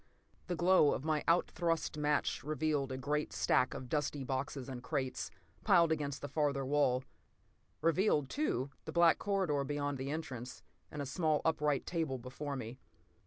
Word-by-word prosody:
The 180 - -1
glow 175 -3 +5
of 135 - -6
my 155 -2 +1
out 170 +1 +3
thrust 165 -3 -1
match 150 -4 0
revealed 150 -2 0
a 130 - -3
great 150 +3 -1
stack 125 - +2
of 130 -2 -6
dusty 145 0 -1
boxes 130 0 -3
and 130 -2 -6
crates, 130 +1 -2 0.3
piled 170 -1 +5
against 145 -3 -2
the - - -2
farther 140 -1 0
wall. 130 -2 +2 0.8
Revealed, 165 -3 +3
too, 140 - -1
the - - -5
black 170 -1 +5
corridor 190 -9 +1
beyond 145 -1 -2
the 135 +1 -3
entrance, 130 -5 -5 0.3
and 145 -1 -4
a - - -5
small, 155 +2 +1
upright 150 -3 +1
table 160 -6 -1
before 135 +4 -5
me. 125 -1 -6
145 Hz, 165 wpm, -34 LUFS, 135-160 Hz, 0.8 s, glow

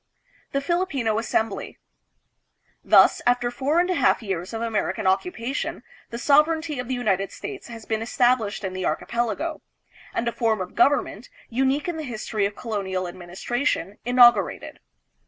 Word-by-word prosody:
The 275 - 0
Filipino 280 -9 0
Assembly. 225 -2 -2 1.1
Thus, - - +6
after 245 0 +2
four 280 +7 +1
and 355 - +3
a 370 - +1
half 330 - +2
years 185 -3 -3
of 225 - -4
American 225 -4 -2
occupation, 235 - -1 0.3
the 235 - -5
sovereignty 300 +2 +2
of 250 - -4
the 260 - -1
United 195 -5 0
States 400 -2 -8
has 230 -2 -10
been 220 -1 -2
established 230 -3 +1
in 190 -1 -3
the 185 0 -4
archipelago, 240 - -2 0.5
and 235 - -2
a - - +1
form 225 -3 0
of 185 -1 -5
government, 320 +7 +1 0.2
unique 270 +5 0
in 345 -2 -2
the 315 - -4
history 215 -5 -2
of 205 - -10
colonial 190 -5 -3
administration, 190 - -3
inaugurated. 245 0 +4
235 Hz, 150 wpm, -24 LUFS, 210-280 Hz, 1.1 s, Thus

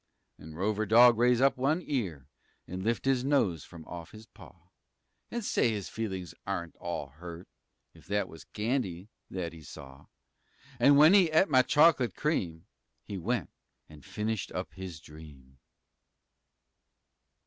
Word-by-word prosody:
Nen 80 0 -11
Rover 105 +4 -1
Dog 115 +2 +7
raise 120 0 +4
up 135 0 +4
one 140 +6 +1
ear 95 - -3 0.4
An' 90 +2 -5
lift 115 +6 -1
his 135 -2 +2
nose 115 - +1
fum 85 -3 -12
off 85 -2 -9
his 110 +1 -12
paw, 90 -4 -18 0.6
An' 235 -1 -4
say 125 - +2
his 105 -4 -3
feelin's 95 -7 -5
aren't 85 -1 -4
all 85 -5 -5
hurt 85 +4 -10 0.5
If - - -19
that 105 0 0
was 80 - -13
candy 105 -5 -3 0.2
that 85 -3 -4
he 80 - -12
saw! 65 -1 -12 0.7
'N 140 +4 +6
w'en 150 +5 +7
he'd 190 -5 +6
et 155 +3 +3
my 130 -1 +6
choc'late 145 - +4
cream 85 - -2 0.4
He 100 - -6
went 100 - -2 0.4
an' 75 -1 -14
finished 105 +4 -3
up - - -5
his 90 -2 -8
dream. 70 -4 -15
100 Hz, 150 wpm, -30 LUFS, 85-125 Hz, 0.7 s, Dog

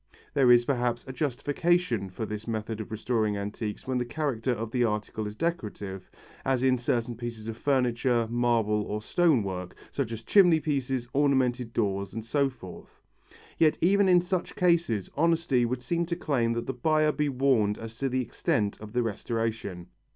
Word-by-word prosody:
There 135 -4 +5
is, 120 0 +6
perhaps, 120 -3 -1
a 130 - -6
justification 145 - 0
for 100 +5 -5
this 105 +1 -6
method 110 -1 -3
of 110 - -8
restoring 110 -1 0
antiques 105 +1 -5
when 130 -1 -1
the - - 0
character 130 -1 -2
of 115 -1 -3
the 125 0 +1
article 105 -1 -2
is 105 - -7
decorative, 105 - -4 0.3
as 130 -1 +1
in 130 -1 +3
certain 120 -1 -1
pieces 115 -2 -6
of 115 - -4
furniture, 125 -2 +1
marble 115 -3 +1
or 105 +1 -4
stone 160 -5 +3
work, 90 -2 -5 0.2
such 135 -5 -2
as 115 0 -6
chimney 175 - +5
pieces, 135 -5 -1
ornamented 130 -4 +2
doors 100 -3 -1
and 110 -1 -5
so 140 +3 +1
forth. 95 -9 -12 0.6
Yet 155 -2 +4
even 195 +2 +4
in 180 -1 +6
such 180 0 -3
cases 170 - +1
honesty 160 -5 +2
would 125 +1 -3
seem 170 +5 -1
to 170 - -1
claim 125 -9 0
that 115 0 -3
the 135 - -3
buyer 155 +4 +2
be 150 -1 0
warned 125 -6 +2
as 115 0 -8
to 135 - 0
the 130 +1 0
extent 105 -3 -1
of 105 0 -9
the 125 0 +1
restoration. 110 -4 -3
120 Hz, 180 wpm, -28 LUFS, 110-140 Hz, 0.6 s, is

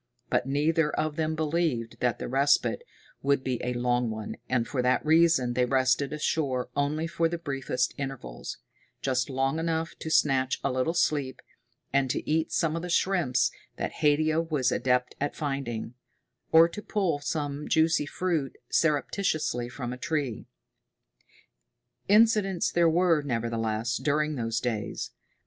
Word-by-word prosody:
But 125 - +1
neither 150 +3 +2
of 155 0 -2
them 160 -1 -1
believed 155 -7 -1
that 125 -1 +1
the - - -5
respite 140 - +2 0.4
would 140 -1 +1
be 125 -2 -2
a 125 - -1
long 120 0 +1
one, 110 -1 -5
and 120 -2 +1
for 130 - -1
that 125 +4 +1
reason 160 -6 +4
they 125 +1 +2
rested 130 +1 +2
ashore 145 -4 -1
only 145 +3 0
for 165 0 0
the 170 - -3
briefest 135 -5 -2
intervals, 135 -2 -6 0.5
just 130 -1 0
long 135 +3 0
enough 165 0 -1
to 160 - -5
snatch 135 -4 +2
a 140 - +1
little 130 +6 0
sleep, 145 -6 0 0.5
and 140 -1 +2
to - - -2
eat 160 +1 +1
some 165 -2 +1
of 165 - -2
the 180 - -5
shrimps 170 -8 +2 0.3
that - - -2
Haidia 155 +1 +3
was 150 -6 0
adept 125 0 +1
at 145 - -1
finding 135 -6 -3 0.6
or 165 +1 +8
to 190 +5 -8
pull 190 -9 0
some 145 0 -3
juicy 160 -2 +2
fruit 160 -6 -2
surreptitiously 150 -4 0
from 125 -1 -5
a - - -7
tree. 140 -6 -2 1.6
Incidents 210 -3 +4
there 170 -1 +4
were, 165 -1 +3
nevertheless, 115 -3 -1
during 150 +1 0
those 115 -4 -1
days. 115 -4 -3
145 Hz, 150 wpm, -28 LUFS, 125-160 Hz, 1.6 s, or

